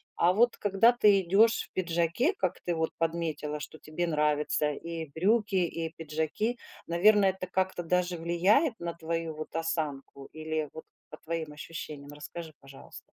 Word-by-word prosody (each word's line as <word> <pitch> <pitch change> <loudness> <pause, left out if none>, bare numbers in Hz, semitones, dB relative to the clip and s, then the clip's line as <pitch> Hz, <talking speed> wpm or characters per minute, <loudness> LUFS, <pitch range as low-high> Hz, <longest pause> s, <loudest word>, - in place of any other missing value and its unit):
А 175 +1 +4
вот 230 +4 +3
когда 205 +4 +4
ты 210 -5 +5
идешь 205 +6 +4
в - - -80
пиджаке, 175 - +1
как - - -1
ты 175 - -1
вот 160 0 -1
подметила, 160 -2 -2
что 155 +1 -9
тебе 155 +3 -3
нравится 150 -1 +1
и 165 +2 -6
брюки, 205 +3 +2
и 165 -2 0
пиджаки, 160 +10 -2 0.3
наверное, 195 +3 +5
это 185 -1 -7
как-то 185 -1 -1
даже 180 +1 0
влияет 195 - +2
на 170 -1 -3
твою, 165 0 -3
вот, 155 0 -7
осанку? 150 -4 -3
Или, 155 -1 -3
вот, 160 - -9 0.3
по - - -10
твоим 160 -2 -4
ощущениям? 150 -1 -8
Расскажи, 155 +2 -8
пожалуйста. 135 0 -12
170 Hz, 155 wpm, -29 LUFS, 155-190 Hz, 0.3 s, ты